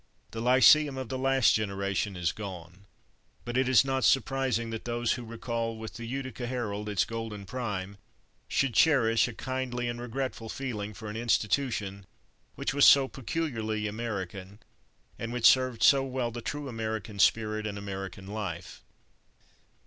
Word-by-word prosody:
The 115 - -5
lyceum 130 +3 +6
of 130 -3 -5
the 130 - -3
last 135 -3 +4
generation 100 -1 -1
is 85 -1 0
gone, 95 -2 -9 0.6
but 120 - -4
it 130 0 +2
is 130 -2 +6
not 135 -1 0
surprising 130 -4 +1
that 110 - -6
those 120 -1 0
who 125 - -2
recall 115 0 -3
with 110 0 -7
the 115 -1 -7
Utica 130 -1 -4
Herald 105 -4 -3
its 100 -2 +1
golden 115 -3 -6
prime 100 -4 -4 0.5
should 135 -3 +1
cherish 115 -8 +4
a 125 - -6
kindly 130 -1 -3
and 120 0 -4
regretful 125 -2 -4
feeling 105 -6 -4
for 110 +2 -8
an 105 +1 -5
institution 105 -4 0 0.5
which - - -2
was 145 0 +6
so 140 -1 +7
peculiarly 115 -6 -3
American, 100 -3 -5 0.6
and 115 0 -4
which 120 -1 -1
served 130 -3 +5
so 135 -1 +6
well 130 -3 -2
the 120 +1 -6
true 145 +4 -4
American 110 -3 -4
spirit 110 +1 +2
and 100 -1 -5
American 95 -1 -6
life. 95 -5 -6
115 Hz, 155 wpm, -29 LUFS, 105-130 Hz, 0.6 s, so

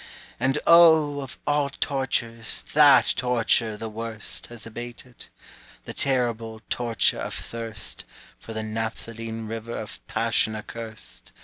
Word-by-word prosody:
And 135 +3 +1
O, 160 -4 +6
of 135 -2 -8
all 145 -1 +1
tortures 120 -5 -2
That 145 -2 +7
torture 115 -3 +1
the 110 +1 -5
worst 110 0 -5
Has 120 -3 -10
abated, 120 +2 -8 0.6
the - - -6
terrible 115 -4 0
Torture 120 -2 +2
of - - -3
thirst 115 -1 -6 0.4
For - - -10
the 110 -1 -4
naphthaline 115 +1 -4
river 115 +1 -5
Of - - -7
Passion 110 - +2
accurst! 110 0 -9
115 Hz, 120 wpm, -25 LUFS, 110-130 Hz, 0.6 s, That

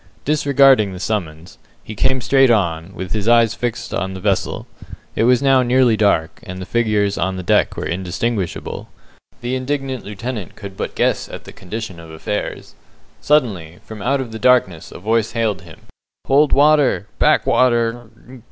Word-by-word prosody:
Disregarding 135 -7 +4
the 90 - -8
summons, 85 -5 -4 0.2
he 110 - -8
came 130 +5 0
straight 135 +1 +4
on, 85 -5 0
with 95 -1 -6
his 105 -1 -2
eyes 115 -1 +4
fixed 120 -1 -4
on 95 +1 -3
the - - -6
vessel. 95 0 -1 0.5
It 115 - +2
was 125 +2 +3
now 135 -1 +4
nearly 125 -1 +3
dark, 100 -7 +1
and 95 0 -8
the 95 - -6
figures 105 -3 0
on 95 +2 -1
the 90 - -5
deck - - +1
were - - -3
indistinguishable. 95 +3 -3 0.5
The 120 +1 -3
indignant 130 -1 -3
lieutenant 105 0 -6
could 100 -3 -9
but - - -5
guess - - 0
at - - -9
the - - -12
condition 95 -1 -7
of 85 -1 -12
affairs. 80 +6 -5 0.5
Suddenly, 100 - 0
from 110 -2 -9
out 135 +4 0
of 120 -3 -7
the 110 - -7
darkness 110 -9 +2
a - - -9
voice 110 +3 0
hailed 110 -6 -1
him 80 -2 -15 0.4
"Hold 145 +2 +3
water! 145 -6 +3
back - - +3
water!" 120 -2 +1
110 Hz, 170 wpm, -19 LUFS, 95-125 Hz, 0.5 s, Disregarding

